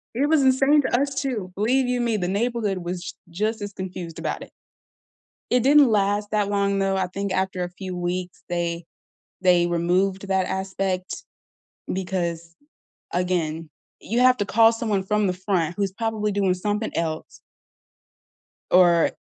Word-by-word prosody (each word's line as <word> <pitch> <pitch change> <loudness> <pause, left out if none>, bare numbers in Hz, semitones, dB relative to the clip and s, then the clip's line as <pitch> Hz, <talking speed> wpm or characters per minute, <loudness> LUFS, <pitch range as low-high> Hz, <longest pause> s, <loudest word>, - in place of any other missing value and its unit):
It 280 +4 +2
was 310 -2 +4
insane 270 +3 +4
to 245 - +1
us, 280 -1 -1
too, 220 -10 -3
believe 250 +5 +2
you 250 -1 0
me, 230 -2 +1
the 180 -2 -2
neighborhood 210 -1 -1
was 175 0 -4
j - - -6 0.2
just 215 +5 -2
as 205 -1 -5
confused 180 -3 -6
about - - -3
it. - - -9 1.0
It 250 -1 +3
didn't 285 -1 +6
last 205 0 +1
that 205 -1 +1
long, 200 -1 +1
though, 195 0 +1
I 190 -1 0
think 200 +1 -4
after 185 -1 -1
a 175 - -5
few 185 0 -7
weeks, 180 0 -4
they 170 -1 -2 0.6
they 180 -2 +4
removed 185 +3 0
that 190 -1 +1
aspect 190 -1 -3 0.7
because, 170 -3 -3 0.6
again, 165 -3 -1 0.3
you 235 +3 -2
have 255 0 +5
to 205 - -1
call 225 +3 +5
someone 215 -4 -1
from 210 +1 +1
the 180 - 0
front 180 -3 -1
who's 200 -2 0
probably 215 0 -2
doing 195 -2 +1
something 210 +4 -2
else 160 -1 -3 1.3
or, 175 -2 +5
195 Hz, 160 wpm, -24 LUFS, 180-220 Hz, 1.3 s, didn't